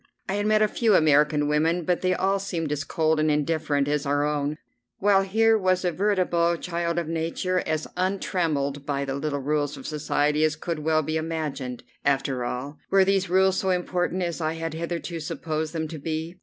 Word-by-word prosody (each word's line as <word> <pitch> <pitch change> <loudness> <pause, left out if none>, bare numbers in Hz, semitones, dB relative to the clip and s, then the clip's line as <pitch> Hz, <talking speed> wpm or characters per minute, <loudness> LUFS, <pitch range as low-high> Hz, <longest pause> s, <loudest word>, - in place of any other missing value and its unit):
I 190 - -2
had 205 +1 0
met 215 0 +4
a - - +4
few 220 -1 +2
American 150 -1 +4
women, 160 +4 +1
but 180 +1 +1
they 185 0 +2
all 195 +2 +1
seemed 165 -6 -3
as 145 -1 -1
cold 160 +1 +1
and 155 0 +2
indifferent 150 -1 +1
as 145 -1 0
our 145 0 +1
own, 150 0 -1 0.4
while 200 -1 +4
here 220 +3 +3
was 185 -1 +1
a 175 - +2
veritable 175 -3 +1
child 170 0 -2
of 170 -2 -1
nature, 165 +3 -1
as 155 0 -1
untrammelled 165 -7 -1
by 140 -1 -2
the 135 - -3
little 145 0 -2
rules 145 +1 -1
of - - -10
society 150 0 0
as 155 -1 +2
could 165 0 -4
well 155 +1 +1
be 155 +2 -1
imagined. 150 -6 -4 0.2
After 135 -2 0
all, 130 +4 -5
were 195 -1 +5
these 195 -1 +1
rules 190 +1 +3
so 190 - 0
important 180 0 0
as 170 -1 -3
I 155 0 0
had 165 -1 -4
hitherto 170 +1 -4
supposed 155 0 -3
them 160 -2 -3
to 160 -1 -7
be? 160 +4 -4
160 Hz, 195 wpm, -25 LUFS, 150-180 Hz, 0.4 s, were